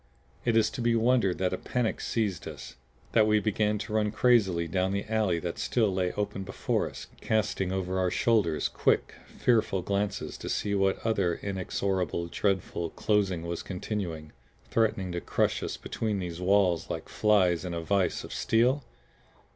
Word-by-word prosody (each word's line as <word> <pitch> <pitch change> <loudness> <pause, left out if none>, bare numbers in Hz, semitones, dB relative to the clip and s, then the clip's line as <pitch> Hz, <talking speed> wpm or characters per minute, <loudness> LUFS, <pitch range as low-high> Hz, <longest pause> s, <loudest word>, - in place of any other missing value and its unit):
Is 115 -2 +3
it - - -17
to 130 - -4
be 120 0 +2
wondered 115 -5 +3
that 95 -1 0
a - - -2
panic 125 -3 -1
seized 105 -6 -1
us; - - -8 0.4
that 110 -2 +4
we 105 0 +4
began 105 0 +1
to 105 +1 -6
run 105 -1 +2
crazily 105 -6 +3
down 95 +2 0
the 100 - -2
alley 105 -5 +1
that 85 0 -4
still 110 -5 +1
lay 90 -1 0
open 105 -1 -3
before 95 0 -1
us, - - -9 0.2
casting 95 -3 0
over 95 0 -1
our 90 -1 +2
shoulders 100 -7 +2
quick, - - +1
fearful 110 -6 +1
glances 100 +1 -2
to - - -6
see 100 - -1
whether 95 -1 +2
that 85 -5 -1
inexorable, 95 -2 -1
dreadful 95 -3 -1
closing 95 -5 0
was 85 0 -4
continuing, 90 -5 -4 0.4
threatening 105 -5 +1
to 85 0 -3
crush - - 0
us - - -4
between 110 -3 -2
these 90 -2 -5
walls 90 -3 +2
like 80 - -4
flies 95 -5 +3
in 90 -2 -4
a 85 - -2
vise 95 +1 0
of - - -8
steel? 120 - +2
95 Hz, 170 wpm, -28 LUFS, 90-110 Hz, 0.4 s, that